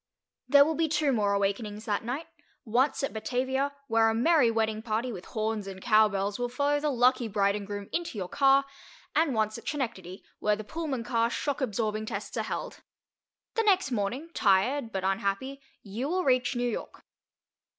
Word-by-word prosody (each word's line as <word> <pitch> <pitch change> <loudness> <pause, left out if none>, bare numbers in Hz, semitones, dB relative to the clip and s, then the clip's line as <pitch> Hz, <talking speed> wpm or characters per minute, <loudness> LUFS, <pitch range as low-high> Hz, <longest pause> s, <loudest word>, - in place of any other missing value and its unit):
There 280 +1 +8
will 320 - 0
be 325 +1 +1
two 300 -2 +2
more 205 -3 +1
awakenings 205 +2 -1
that 205 -1 -1
night—once 260 0 -2
at 275 - -1
Batavia, 260 +5 -1 0.2
where 225 0 +4
a 225 - 0
merry 275 +1 +4
wedding 220 -1 0
party 225 +2 -2
with 185 -5 -8
horns 215 -2 -2
and 190 -1 -7
cow 215 +1 +5
bells 200 +2 -2
will 245 0 -1
follow 285 +3 +1
the 300 +1 0
lucky 250 -2 +3
bride 200 -1 +1
and 205 -1 -5
groom 205 -1 -5
into 340 -9 -2
your 185 -3 -3
car, 275 +5 +4 0.5
and 310 -6 +2
once 215 +1 0
at - - -16
Schenectady, 195 - -4 0.2
where 210 0 +2
the 215 - -7
Pullman 285 -1 -4
car 230 0 +1
shock 285 +3 -2
absorbing 215 -2 -1
tests - - -5
are - - 0
held. - - -5 0.7
The 455 - +1
next 380 -9 +3
morning, 245 +9 -2
tired 225 +6 +2
but 190 -2 -3
unhappy, 200 +8 -1 0.2
you 225 +7 -4
will 365 +2 0
reach 255 -1 +2
New 245 0 0
York. 235 - -5
230 Hz, 180 wpm, -28 LUFS, 210-275 Hz, 0.7 s, There